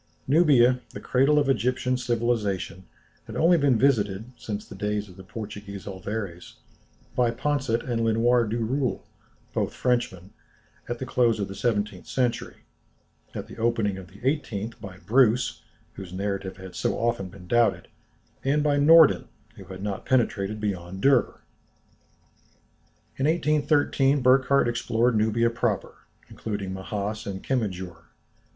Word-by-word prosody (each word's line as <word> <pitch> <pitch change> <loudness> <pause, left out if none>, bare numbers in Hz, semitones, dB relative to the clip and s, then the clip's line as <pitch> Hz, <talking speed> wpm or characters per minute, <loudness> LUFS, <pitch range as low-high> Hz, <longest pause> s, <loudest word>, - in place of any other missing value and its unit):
Nubia, 130 -5 +5
the - - -6
cradle 135 +4 +2
of 145 -2 +3
Egyptian 125 0 +1
civilization, 115 -7 -1 0.4
had - - -8
only 170 +2 +4
been 140 -6 +3
visited, 110 -3 +1
since 105 -3 -6
the - - -11
days 105 +1 -2
of 90 - -14
the 95 - -12
Portuguese 100 -2 -8
Alvares, 95 -2 -6 0.6
by 125 -1 +3
Poncet 125 -1 -1
and 115 -2 -1
Lenoir 115 +1 +3
Duroule, 120 +4 -1 0.5
both - - -1
Frenchmen, 120 -7 -1 0.6
at 120 - -2
the 130 - -5
close 120 -4 +2
of 100 - -1
the 95 - -7
seventeenth 105 -4 -2
century, 125 -3 -2 0.7
at - - -4
the - - -12
opening 115 -4 0
of 95 - -11
the 100 +4 -17
eighteenth 115 -7 -2
by 95 -2 -9
Bruce, 115 +5 +2 0.3
whose 95 -3 -9
narrative 95 0 -3
had 95 -1 -10
so 85 - -1
often 115 -5 -1
been 90 0 -13
doubted, 120 +5 +2 0.6
and 145 +2 +2
by 145 -1 +2
Norden, 160 +1 +6 0.3
who - - -12
had 95 0 -9
not 100 -2 -4
penetrated 110 -5 +1
beyond 95 -3 -4
Derr. 135 0 +3 1.8
In 135 - +1
1813 150 -3 +2
Burckhardt 130 +1 +4
explored 115 0 +1
Nubia 110 +2 +2
proper, 115 -4 -1 0.3
including 100 -3 -5
Mahass 105 +3 -4
and 95 -1 -5
Kemijour. 95 -9 -3
115 Hz, 135 wpm, -26 LUFS, 100-130 Hz, 1.8 s, Norden